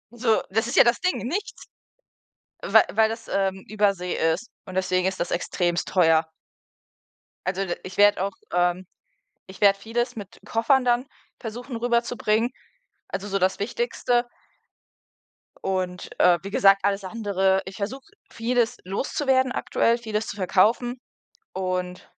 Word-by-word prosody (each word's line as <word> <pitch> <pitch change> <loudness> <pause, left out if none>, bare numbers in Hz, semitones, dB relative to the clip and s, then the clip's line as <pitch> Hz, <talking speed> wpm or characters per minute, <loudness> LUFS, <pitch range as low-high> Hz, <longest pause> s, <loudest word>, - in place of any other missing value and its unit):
So, 230 -2 +2
das 225 +3 +1
ist - - -3
ja - - +8
das 235 0 +2
Ding, 365 - 0
nichts. 410 +9 -4 1.0
Wei - - +5
weil 220 +1 +4
das, 225 0 -7
ähm, 190 -1 -1
Übersee 200 -4 0 0.2
ist 195 +9 -5 0.2
und 185 - -9
deswegen 185 -1 +1
ist 190 - -2
das 170 - -1
extrem 175 0 -1
teuer. 165 -3 +4 1.2
Also 195 +1 -1
d 175 - -2
ich 185 +1 -9
werde 205 -2 +5
auch, 200 - -2 0.2
ähm 180 +1 +1 0.6
ich 190 +2 -12
werde 200 -1 +5
vieles 230 +3 -2
mit 200 -2 -9
Koffern 240 +4 +2
dann 245 +2 +2 0.3
versuchen 240 +2 -6
rüberzubringen, 235 -1 +1 0.6
also, 205 +2 -5
so 195 0 0
das 190 +1 +1
Wichtigste. 245 - 0 1.4
Und, 185 -1 -3
äh, 175 -1 +5
wie 195 - -7
gesagt, 195 -1 +4
alles 200 0 0
andere 195 -2 0
ich 190 - -9
versuche 245 +6 -6 0.2
vieles 240 +1 0
loszuwerden 260 +6 0
aktuell, 235 -2 +1
vieles 220 -2 -3
zu - - -5
verkaufen 220 +6 +2 0.5
und 185 -1 -3
205 Hz, 140 wpm, -24 LUFS, 190-235 Hz, 1.4 s, ja